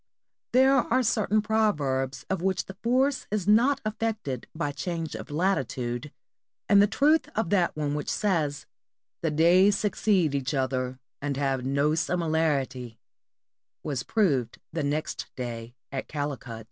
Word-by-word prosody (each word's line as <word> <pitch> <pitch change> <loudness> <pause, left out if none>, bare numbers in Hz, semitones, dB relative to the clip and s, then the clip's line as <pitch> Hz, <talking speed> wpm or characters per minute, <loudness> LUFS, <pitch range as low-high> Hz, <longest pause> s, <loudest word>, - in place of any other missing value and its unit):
There 265 +2 +5
are 255 -1 +2
certain 215 -2 +1
proverbs 145 -12 0
of 190 -2 -2
which 190 0 0
the 190 - -9
force 260 +3 +1
is 205 -3 -2
not 235 +7 +4
affected 215 - -3
by 155 -3 -1
change 160 +3 -4
of - - -7
latitude, 135 -6 -1 0.6
and 200 -2 +6
the 205 - +5
truth 300 +8 +2
of 215 -5 -1
that 180 -4 +2
one 145 -1 -1
which 150 0 -3
says, 160 -9 0 0.6
"The 165 - +1
days 175 +6 +5
succeed 195 -6 +1
each 140 +1 -1
other 130 -1 -1 0.2
and 140 -1 -2
have 135 -2 0
no 140 +2 +2
similarity," 155 -8 -1 0.9
was 140 -5 -2
proved 140 - +1 0.2
the 165 - -1
next 145 +2 -2
day 120 -1 -6 0.2
at 135 -1 -4
Calicut. 140 -6 -4
160 Hz, 140 wpm, -27 LUFS, 135-205 Hz, 0.9 s, and